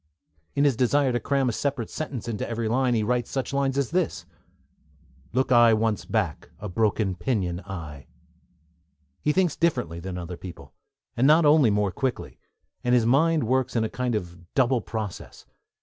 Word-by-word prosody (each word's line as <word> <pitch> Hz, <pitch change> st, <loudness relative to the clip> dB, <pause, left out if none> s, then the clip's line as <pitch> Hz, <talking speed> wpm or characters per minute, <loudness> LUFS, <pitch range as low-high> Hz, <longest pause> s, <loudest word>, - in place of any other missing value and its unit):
In 140 Hz, -, +2 dB
his 140 Hz, -4 st, +3 dB
desire 130 Hz, +3 st, +2 dB
to 120 Hz, -, 0 dB
cram 135 Hz, -1 st, 0 dB
a -, -, +2 dB
separate 130 Hz, 0 st, -2 dB
sentence 135 Hz, -7 st, -5 dB
into 115 Hz, -1 st, -3 dB
every 115 Hz, -1 st, -2 dB
line, 125 Hz, +2 st, +2 dB
he 110 Hz, -, +1 dB
writes 120 Hz, +2 st, 0 dB
such 135 Hz, 0 st, -3 dB
lines 140 Hz, -1 st, 0 dB
as: 140 Hz, -, -1 dB, 1.1 s
Look 130 Hz, +2 st, 0 dB
I 120 Hz, -2 st, +6 dB
once 110 Hz, -2 st, 0 dB
back, -, -, -2 dB
a 105 Hz, -, -5 dB
broken 105 Hz, 0 st, 0 dB
pinion 90 Hz, -2 st, -2 dB
I, 75 Hz, -7 st, -8 dB, 1.1 s
He 150 Hz, -, +2 dB
thinks 180 Hz, -1 st, +1 dB
differently 85 Hz, -, 0 dB
from 90 Hz, 0 st, -5 dB
other 90 Hz, 0 st, -6 dB
people, 90 Hz, -1 st, -10 dB, 0.4 s
and 130 Hz, +3 st, +3 dB
not 155 Hz, +2 st, +6 dB
only 145 Hz, -4 st, +6 dB
more 105 Hz, -1 st, +1 dB
quickly; 130 Hz, +4 st, -3 dB, 0.4 s
and 125 Hz, 0 st, +3 dB
his 120 Hz, -2 st, +3 dB
mind 155 Hz, +5 st, +3 dB
works 130 Hz, +2 st, 0 dB
in 115 Hz, -, +2 dB
a 110 Hz, -, -1 dB
kind 125 Hz, -2 st, -2 dB
of 90 Hz, -4 st, -5 dB, 0.2 s
double 130 Hz, -2 st, +3 dB
process. 105 Hz, -3 st, -6 dB
120 Hz, 170 wpm, -25 LUFS, 105-135 Hz, 1.1 s, I